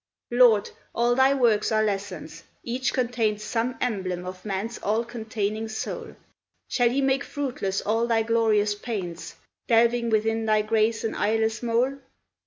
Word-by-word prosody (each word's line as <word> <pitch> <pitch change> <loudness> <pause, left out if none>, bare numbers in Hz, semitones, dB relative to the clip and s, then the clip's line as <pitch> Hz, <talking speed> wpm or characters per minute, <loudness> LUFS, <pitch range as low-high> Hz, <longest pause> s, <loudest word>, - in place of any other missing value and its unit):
Lord! 240 -4 +5 0.2
all 240 +1 +3
thy 265 +2 +4
works 235 -6 +2
are 215 0 +3
lessons, 195 -6 -4 0.2
each 250 +2 -1
contains 225 -4 0
Some 235 +3 -1
emblem 185 -7 -2
of 185 0 -8
man's 210 +3 -4
all 220 +3 0
containing 220 -2 -3
soul; 220 - -5 0.5
Shall 245 -2 +2
he 265 +4 0
make 270 +1 +2
fruitless 250 -11 -3
all 225 +3 0
thy 225 -1 +2
glorious 220 -2 +2
pains, 195 -6 -6 0.3
Delving 235 0 +3
within 225 0 +1
thy 215 -1 +3
grace 220 +1 +1
an 225 - -1
eyeless 220 0 0
mole? 245 +4 0
225 Hz, 145 wpm, -25 LUFS, 210-240 Hz, 0.5 s, Lord